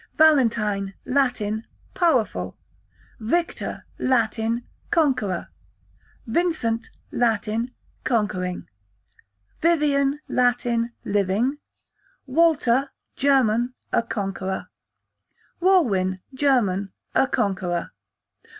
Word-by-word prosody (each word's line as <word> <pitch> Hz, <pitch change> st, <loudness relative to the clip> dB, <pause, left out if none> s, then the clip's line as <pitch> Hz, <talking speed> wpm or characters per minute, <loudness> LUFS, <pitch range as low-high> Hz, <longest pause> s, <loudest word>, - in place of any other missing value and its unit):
Valentine, 225 Hz, -10 st, +3 dB
Latin, 245 Hz, -5 st, 0 dB, 0.3 s
powerful. 295 Hz, -, +1 dB, 0.6 s
Victor, 335 Hz, +10 st, -2 dB
Latin, 230 Hz, -1 st, +1 dB, 0.2 s
conqueror. 255 Hz, -, +1 dB, 0.8 s
Vincent, 240 Hz, -5 st, 0 dB, 0.2 s
Latin, 230 Hz, +1 st, 0 dB, 0.3 s
conquering. 200 Hz, -6 st, -1 dB, 0.9 s
Vivian, 290 Hz, -4 st, +2 dB
Latin, 245 Hz, -1 st, +1 dB
living. 205 Hz, +8 st, +1 dB, 0.7 s
Walter, 280 Hz, -3 st, +3 dB, 0.3 s
German, 250 Hz, -3 st, +2 dB, 0.2 s
a -, -, +4 dB
conqueror. 195 Hz, -4 st, -4 dB, 0.9 s
Walwin, 210 Hz, -, +3 dB
German, 225 Hz, -9 st, +1 dB, 0.2 s
a 270 Hz, -, +4 dB
conqueror. 185 Hz, -6 st, -1 dB
235 Hz, 65 wpm, -24 LUFS, 205-275 Hz, 0.9 s, a